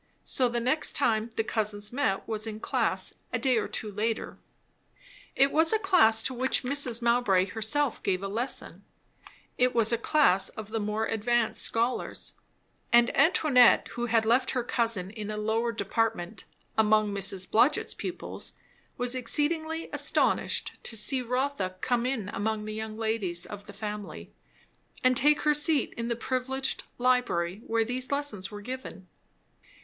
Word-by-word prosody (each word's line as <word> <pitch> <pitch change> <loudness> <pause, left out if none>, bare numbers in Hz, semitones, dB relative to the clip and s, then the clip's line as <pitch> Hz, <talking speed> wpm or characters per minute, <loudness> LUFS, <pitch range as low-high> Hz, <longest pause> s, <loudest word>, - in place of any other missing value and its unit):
So 255 -2 +1
the 240 0 -1
next 255 +6 +1
time 220 +1 +1
the 225 - 0
cousins 210 -1 -2
met 220 -8 -1
was 220 0 -2
in 215 -1 -6
class, - - 0 0.2
a - - 0
day 260 -3 +2
or 220 - -1
two 215 - -5
later. 220 +3 -3 1.0
It 275 +1 +4
was 320 +1 +4
a 440 - +4
class 360 - +4
to 260 - -1
which 255 +2 0
Mrs. 250 -3 0
Mowbray 235 -6 +3
herself 225 +7 -1
gave 190 -1 -1
a - - -2
lesson; 230 +6 -4 0.8
it 250 0 +2
was 230 0 +3
a 230 - +1
class 230 -9 +3
of 215 -1 -9
the 225 0 -2
more 210 +1 -1
advanced 225 +1 +1
scholars; 235 +2 -1 0.6
and 240 0 +4
Antoinette, 290 -7 +5
who 240 0 -4
had 225 -1 +2
left 240 +4 +2
her 250 - 0
cousin 225 -6 -1
in 215 -1 -7
a 215 - -4
lower 220 +2 0
department, 220 -3 -2 0.3
among 215 -1 +3
Miss 195 -1 0
Blodgett's 245 +9 +2
pupils, - - -6 0.4
was 245 -1 +1
exceedingly 315 +6 -1
astonished - - +1
to 225 - -2
see 255 +5 +1
Rotha 250 -6 -2
come 245 +2 0
in 240 -7 -2
among 215 +1 -2
the 215 - -5
young 220 0 -5
ladies 215 -6 -2
of 205 0 -10
the - - -8
family 210 0 -7 0.7
and 255 0 +4
take 295 +4 +4
her 300 - +3
seat 295 0 +2
in 230 0 -4
the 235 - -1
privileged 260 +2 -2
library 240 -7 +1
where 225 0 +1
these 250 +3 -3
lessons 280 -10 -2
were 205 -1 -9
given. 250 -5 -8
230 Hz, 160 wpm, -28 LUFS, 210-255 Hz, 1.0 s, Antoinette